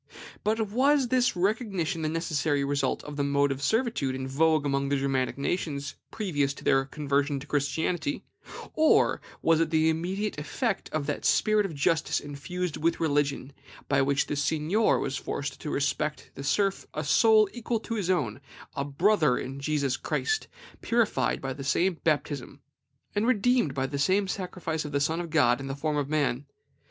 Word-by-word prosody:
But 215 -1 0
was 270 +2 +3
this 250 -3 +2
recognition 190 -4 -1
the 155 - 0
necessary 155 -3 0
result 140 0 -1
of 150 0 -8
the 140 - +1
mode 140 0 +2
of 135 0 -4
servitude 220 - 0
in 130 0 -4
vogue 155 +2 +2
among 140 0 0
the 140 - +2
Germanic 135 -2 -1
nations 140 -2 -2 0.2
previous 145 -10 -1
to - - -12
their 135 0 +3
conversion 140 0 -1
to 135 - -10
Christianity, 160 - -1 0.5
or 315 0 +3 0.2
was 165 -1 +4
it 165 - +1
the 160 0 +3
immediate 185 +3 -2
effect 195 - -2
of 155 -2 -2
that 145 - -3
spirit 215 -1 +3
of 165 - -9
justice 155 +2 +1
infused 155 +4 -4
with 165 +2 0
religion, 145 -3 0 0.3
by 135 0 +3
which 140 +1 +2
the - - -3
seignior 160 +8 +2
was 135 - -2
forced 145 -1 -4
to 150 - -4
respect 150 +2 -1
in - - -22
the 140 - -8
serf 195 +6 0
a 155 - -2
soul 215 +9 +5
equal 240 -1 -2
to 230 - -5
his 200 -5 -2
own, 130 - 0 0.3
a 140 - -2
brother 150 -1 +2
in 135 +2 -5
Jesus 140 -2 0
Christ, 435 0 -1 0.3
purified 225 - +1
by 135 -1 -4
the 135 +1 -8
same 170 +6 +1
baptism, 145 -4 -1 0.5
and 210 +3 +1
redeemed 245 - +2
by 135 -1 0
the 140 +1 -4
same 190 +7 +2
sacrifice 180 -4 -3
of 150 -1 -7
the 140 - +2
Son 160 +4 0
of 170 - -6
God 135 -6 +3
in 135 - -6
the 135 - -3
form 150 +1 -1
of 145 -1 -1
man? 145 -3 0
150 Hz, 180 wpm, -27 LUFS, 140-190 Hz, 0.5 s, soul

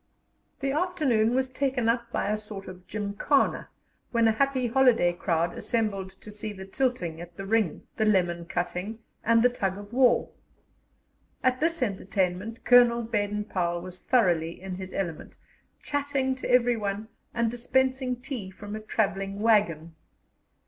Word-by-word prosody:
The 275 0 0
afternoon 280 -9 +1
was 260 0 0
taken 260 -3 0
up 235 0 0
by 205 - 0
a 215 - +1
sort 210 -2 -8
of 185 0 -11
gymkhana, 210 +7 0 0.4
when 230 -1 +3
a - - +5
happy 260 +2 +1
holiday 235 -7 +4
crowd 170 -1 0
assembled 210 -5 -1
to 210 - -10
see 210 +1 -5
the 190 -1 -9
tilting 190 -7 -1
at 175 0 -11
the 195 - -5
ring, 215 -3 +1
the 220 - +2
lemon 175 -5 +2
cutting, 180 +5 -3 0.3
and 230 0 +4
the 250 - +6
tug 195 -6 -2
of 205 +2 -10
war. 250 -1 +4 1.1
At 255 0 +2
this 330 -2 +1
entertainment 195 +1 -2
Colonel 240 -1 +6
Baden 210 -2 -1
Powell 175 -4 -1
was 185 0 -8
thoroughly 170 -9 +2
in 190 0 -6
his 185 0 -6
element, 170 -5 -4 0.5
chatting 285 -2 0
to 260 - -6
everyone 225 -4 +2 0.2
and 235 -1 0
dispensing 260 +1 +1
tea 245 -5 -6
from 205 +2 -8
a - - -4
travelling 200 -2 -1
waggon. 185 -8 +2
215 Hz, 150 wpm, -27 LUFS, 190-250 Hz, 1.1 s, the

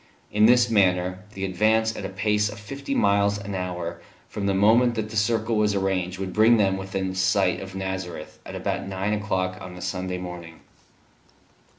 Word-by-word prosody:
In 105 +1 +5
this 120 0 +5
manner 90 -4 +2 0.2
the 95 0 -3
advance 110 +4 +2
at 100 - -5
a - - -3
pace 105 +2 +1
of 105 0 -9
fifty 135 +6 -5
miles 100 0 +3
an 100 0 -6
hour 90 -2 -4 0.3
from 100 -1 -4
the 100 - +2
moment 115 +5 +4
that 110 -1 -3
the - - -7
circle 110 +1 +1
was 105 -1 +2
arranged 95 -2 -1
would 95 -1 -4
bring 110 +2 +5
them 95 -3 +2
within 95 -1 -3
sight 95 0 +2
of 95 0 -8
Nazareth 95 -4 -5
at - - -8
about - - -3
nine 95 +2 -2
o'clock 95 -3 -2
on 90 -1 -8
the 90 - -10
Sunday 90 -1 -3
morning. 90 -2 -8
95 Hz, 185 wpm, -25 LUFS, 95-105 Hz, 0.3 s, In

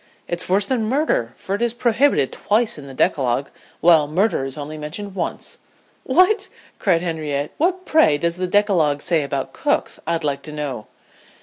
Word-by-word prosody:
"It's 175 +1 -3
worse 195 +2 +3
than 240 -3 0
murder, 260 - +1
for 195 - -5
it 205 - -2
is 235 -1 +1
prohibited 240 - +2
twice 215 -4 0
in 140 - -10
the 135 - -9
decalogue, 130 0 +1 0.3
while 160 -3 +5
murder 175 -2 +1
is 135 +1 -6
only 150 +1 -6
mentioned 160 +7 -6
once." 180 -3 -4 0.5
"What!" 370 +5 +3 0.3
cried 175 -4 +2
Henrietta 150 -4 -2
"What, 365 +4 0
pray, 155 - +4
does 170 +2 -1
the 185 0 -1
decalogue 180 -8 +2
say 165 -3 +2
about 140 -1 -3
cooks, - - -1
I'd 165 -1 -1
like 140 -2 -1
to 155 - -6
know?" 145 -7 -5
170 Hz, 175 wpm, -21 LUFS, 145-210 Hz, 0.5 s, while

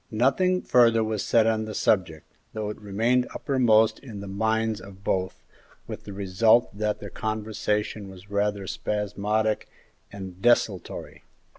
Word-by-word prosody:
Nothing 140 +11 +2
further 115 -2 +4
was 110 -2 -2
said 115 -2 +3
on 110 -1 +1
the 110 - -6
subject, 80 -7 +1 0.3
though 105 -1 -3
it 105 - -11
remained 115 +5 +1
uppermost 115 -5 +3
in 115 -7 -9
the 100 - -7
minds 110 +2 0
of 95 0 -13
both, 95 -1 -2 0.4
with - - -8
the 100 - -7
result 100 +4 +3
that 105 0 -1
their 100 - -8
conversation 105 -1 -2
was 95 +1 -14
rather 100 -1 0
spasmodic 105 +2 -1 0.4
and 95 -2 -9
desultory. 110 -5 0
105 Hz, 140 wpm, -26 LUFS, 100-110 Hz, 0.4 s, further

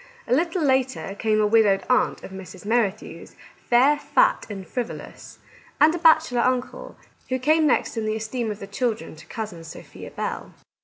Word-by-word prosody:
A - - +1
little 335 +4 +1
later 265 -6 0
came 215 -1 +1
a 210 - +3
widowed 210 -2 +3
aunt 250 - +1
of - - -9
Mrs. 190 0 -10
Mer 230 +1 +3
rithew's, 190 - -12 0.2
fair, 265 +5 +3
fat, - - +2
and 195 -2 -7
frivolous; 245 +2 -7 0.4
and 315 +1 +6
a 345 - -3
bachelor 315 -7 +4
uncle, 255 - -2 0.3
who 255 - 0
came 310 +4 +3
next 265 - +1
in 220 -1 -2
the 215 - -1
esteem 220 +1 -3
of 210 - -4
the 200 - -8
children 215 -5 -3
to 155 +1 -15
Cousin 210 -7 -6
Sophia 165 - -11
Bell. - - -5
240 Hz, 175 wpm, -23 LUFS, 210-265 Hz, 0.4 s, and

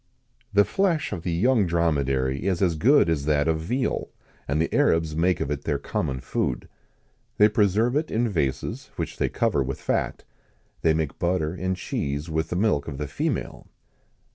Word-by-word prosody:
"The 100 0 +5
flesh 175 - 0
of 95 -5 -4
the 85 - -2
young 105 +4 +3
dromedary 70 -4 0
is 90 -3 +1
as 85 -3 +2
good 130 - +4
as 80 -4 0
that 75 0 +2
of 80 -1 +1
veal, 125 +12 -2 0.4
and 70 +3 0
the 80 - 0
Arabs 80 -2 +2
make 90 +3 +2
of 70 - -2
it 75 -1 -3
their 75 -3 0
common 65 -1 -3
food. 65 - -2 0.7
They 105 - +7
preserve 110 +3 +2
it 155 +2 0
in 120 +2 +1
vases, 70 - -2
which - - -4
they - - 0
cover 70 - +1
with 65 0 -3
fat. - - -1 0.6
They 80 -1 +3
make 80 -3 -2
butter 85 -3 0
and 95 +1 -2
cheese 70 -2 -3
with 80 +1 -1
the - - -2
milk 90 -7 +1
of 70 -4 -5
the 75 0 -3
female." 70 - -3
80 Hz, 180 wpm, -25 LUFS, 75-100 Hz, 0.7 s, They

